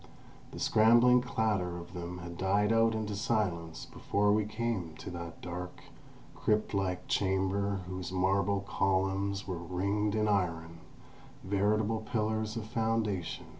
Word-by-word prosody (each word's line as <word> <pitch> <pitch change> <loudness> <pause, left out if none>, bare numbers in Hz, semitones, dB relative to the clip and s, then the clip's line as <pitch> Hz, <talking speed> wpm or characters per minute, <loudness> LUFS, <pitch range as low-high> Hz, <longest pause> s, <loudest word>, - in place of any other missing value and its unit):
The - - -9
scrambling 120 +3 +5
clatter 105 -7 -1
of 85 +1 -9
them 90 0 -5
had 85 -1 -7
died 100 +4 +2
out 115 0 +3
into 105 -2 -2
silence 95 -6 -1
before 100 0 0
we 105 0 +2
came 105 -7 -3
to - - -7
that 85 -1 -7
dark, 90 +1 -6 0.5
crypt 105 0 0
like 90 -2 -1
chamber 95 +1 0
whose 90 -1 -5
marble 95 +2 +1
columns 95 0 0
were 90 -3 -3
ringed 100 +5 -1
in 110 0 +2
iron, 85 -5 -1 0.6
veritable 105 +3 +1
pillars 110 -1 -1
of 110 - -4
foundation. 110 -6 -1
100 Hz, 130 wpm, -31 LUFS, 90-110 Hz, 0.6 s, scrambling